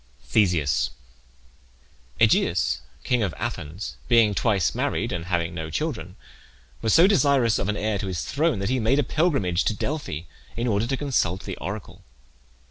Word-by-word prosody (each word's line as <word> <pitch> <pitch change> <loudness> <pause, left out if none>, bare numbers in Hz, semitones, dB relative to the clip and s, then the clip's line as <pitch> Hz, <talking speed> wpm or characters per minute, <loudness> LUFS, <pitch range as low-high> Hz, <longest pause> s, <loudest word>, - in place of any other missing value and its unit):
THESEUS. 85 - +2 1.3
Aegeus, - - +3 0.2
king 125 -2 +1
of 95 -6 -1
Athens, 80 +7 -5
being 115 -3 +5
twice 100 -4 +1
married, - - -1
and 85 -1 -3
having 85 -1 -1
no 80 -2 -5
children, 95 - -3 0.7
was 110 - +1
so 165 - +7
desirous 140 - +3
of 95 - -1
an 105 - -1
heir 105 -1 -1
to 100 - -3
his 90 -3 -3
throne 155 -1 +1
that 100 +2 -2
he 130 0 +1
made 115 +5 +2
a 145 - +3
pilgrimage 135 - +1
to 110 - +1
Delphi 140 - -3 0.4
in 120 - -1
order 110 -1 +1
to 135 +1 -1
consult 110 - 0
the - - -5
oracle. 100 +5 -7
105 Hz, 160 wpm, -24 LUFS, 90-130 Hz, 1.3 s, so